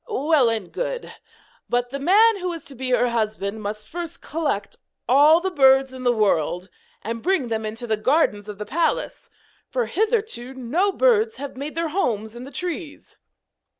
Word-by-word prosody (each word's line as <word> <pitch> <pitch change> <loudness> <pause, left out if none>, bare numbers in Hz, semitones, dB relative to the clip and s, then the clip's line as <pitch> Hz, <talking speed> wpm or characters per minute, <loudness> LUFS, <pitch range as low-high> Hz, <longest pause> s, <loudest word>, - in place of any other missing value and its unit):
Well 300 - +3
and 220 -5 -3
good. - - -4 0.6
But 245 0 0
the 275 - -4
man 415 +9 +5
who 360 -1 -2
is 330 -3 -8
to 285 - -9
be 260 0 -4
her 245 -1 +3
husband 215 -2 -2
must 210 +1 -5
first 340 -1 -6
collect 290 -11 -3 0.3
all 290 +6 +6
the 380 +2 -2
birds 270 -3 +4
in 260 - -8
the 245 -1 +3
world, 185 -5 +1 0.3
and 230 +2 -4
bring 355 -9 +1
them 220 -1 -2
into 225 +3 -5
the 220 -2 0
gardens 215 -4 +1
of 205 - -7
the 210 - -5
palace; 330 +8 -1 0.4
for - - 0
hitherto 425 - -1
no 305 +11 0
birds 450 0 +3
have 280 -1 -7
made 285 +4 -6
their 330 -1 -1
homes 225 - -1
in 240 +1 -8
the 275 - -10
trees.' 345 -3 -6
265 Hz, 180 wpm, -23 LUFS, 225-345 Hz, 0.6 s, all